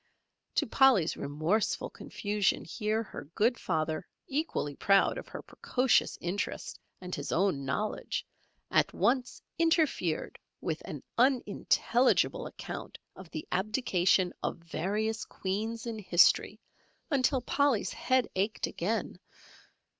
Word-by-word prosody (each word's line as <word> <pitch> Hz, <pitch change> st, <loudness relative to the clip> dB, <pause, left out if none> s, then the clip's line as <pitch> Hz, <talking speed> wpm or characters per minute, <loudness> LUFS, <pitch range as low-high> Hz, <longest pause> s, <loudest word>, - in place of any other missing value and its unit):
To -, -, +2 dB
Polly's 260 Hz, -, +4 dB
remorseful 155 Hz, +9 st, -1 dB
confusion 205 Hz, -1 st, -1 dB
here 215 Hz, +4 st, -1 dB
her 195 Hz, -, -9 dB
good 235 Hz, +3 st, +2 dB
father 155 Hz, -2 st, -1 dB, 0.2 s
equally 270 Hz, -, -2 dB
proud 195 Hz, +5 st, +3 dB
of -, -, -10 dB
her -, -, -8 dB
precocious 255 Hz, -1 st, +1 dB
interest 180 Hz, +4 st, -3 dB, 0.2 s
and 180 Hz, -1 st, -7 dB
his 145 Hz, -, -3 dB
own 170 Hz, -6 st, +1 dB
knowledge, 210 Hz, +11 st, -2 dB, 0.5 s
at -, -, +2 dB
once 250 Hz, +1 st, +1 dB, 0.2 s
interfered 315 Hz, -, +1 dB, 0.2 s
with 160 Hz, -2 st, -3 dB
an 145 Hz, -, -7 dB, 0.2 s
unintelligible 255 Hz, -, +2 dB
account -, -, -7 dB, 0.2 s
of 190 Hz, -3 st, -11 dB
the 155 Hz, -, -6 dB
abdication 190 Hz, -3 st, +2 dB
of -, -, -2 dB
various 205 Hz, +7 st, -2 dB
Queens 220 Hz, +5 st, -3 dB
in 230 Hz, -2 st, -4 dB
history 180 Hz, -3 st, +4 dB, 0.5 s
until 265 Hz, -1 st, +3 dB
Polly's 270 Hz, -2 st, +1 dB
head 255 Hz, -1 st, +1 dB
ached 200 Hz, +3 st, 0 dB
again. 200 Hz, 0 st, -2 dB
210 Hz, 115 wpm, -30 LUFS, 175-245 Hz, 0.5 s, Polly's